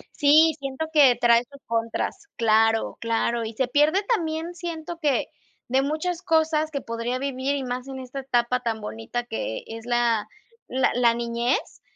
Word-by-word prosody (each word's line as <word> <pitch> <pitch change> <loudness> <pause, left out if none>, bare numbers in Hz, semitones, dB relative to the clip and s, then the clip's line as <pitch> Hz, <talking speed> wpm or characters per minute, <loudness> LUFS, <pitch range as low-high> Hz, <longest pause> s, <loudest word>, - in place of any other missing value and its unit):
Sí, 310 +2 +5
siento 275 +3 -4
que 275 -5 +6
trae 235 0 +5
sus 280 -1 -14
contras. 230 - -2
Claro, 225 0 +2
claro, 230 0 0
y 220 0 -6
se 260 +4 0
pierde 295 +9 +3
también 330 -2 -3
siento 335 -1 -6
que 290 -5 +1 0.4
de 265 +2 +2
muchas 315 +5 -2
cosas 315 -3 +2
que 280 -3 -4
podría 230 +2 -3
vivir, 275 +1 -1
y 270 - -3
más 250 +1 -4
en 265 -1 -6
esta 260 +1 -6
etapa 250 -1 +1
tan 225 -2 -2
bonita 210 - -5
que 220 - -4
e - - -11
es 225 - -13
la 240 -3 +1 0.4
la 260 +1 +2
la 240 -1 +4
niñez, 235 +2 -2
260 Hz, 170 wpm, -24 LUFS, 235-310 Hz, 0.4 s, que